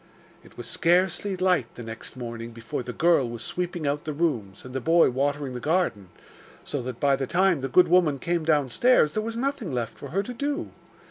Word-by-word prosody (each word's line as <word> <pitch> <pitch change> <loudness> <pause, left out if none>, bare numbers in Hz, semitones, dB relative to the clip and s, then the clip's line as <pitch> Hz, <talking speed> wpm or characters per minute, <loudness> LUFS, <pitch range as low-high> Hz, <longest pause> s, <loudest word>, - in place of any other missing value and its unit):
It - - -19
was - - -7
scarcely 185 +3 +1
light 180 -10 +1
the 120 - -8
next 115 +2 -7
morning 115 -1 -6
before 115 +1 -5
the 125 - -6
girl 160 -3 +3
was 115 -1 -6
sweeping 175 -3 -3
out 145 +1 -1
the 155 - -4
rooms, 125 - -2
and 125 - -9
the 130 - -2
boy 165 -1 +4
watering 140 +1 -1
the 125 - -4
garden, 150 - 0 0.5
so 145 - -4
that 125 -1 -6
by 140 -2 +3
the 135 -1 -3
time 180 -2 +2
the 135 - -3
good 180 +8 +5
woman 170 -5 +3
came 170 +3 -1
downstairs 155 - +3
there 215 - 0
was 225 +1 -4
nothing 270 - -2
left 120 -3 -3
for 140 - -7
her 195 +8 -1
to 245 - -6
do. 285 +6 -3
150 Hz, 210 wpm, -26 LUFS, 125-180 Hz, 0.5 s, good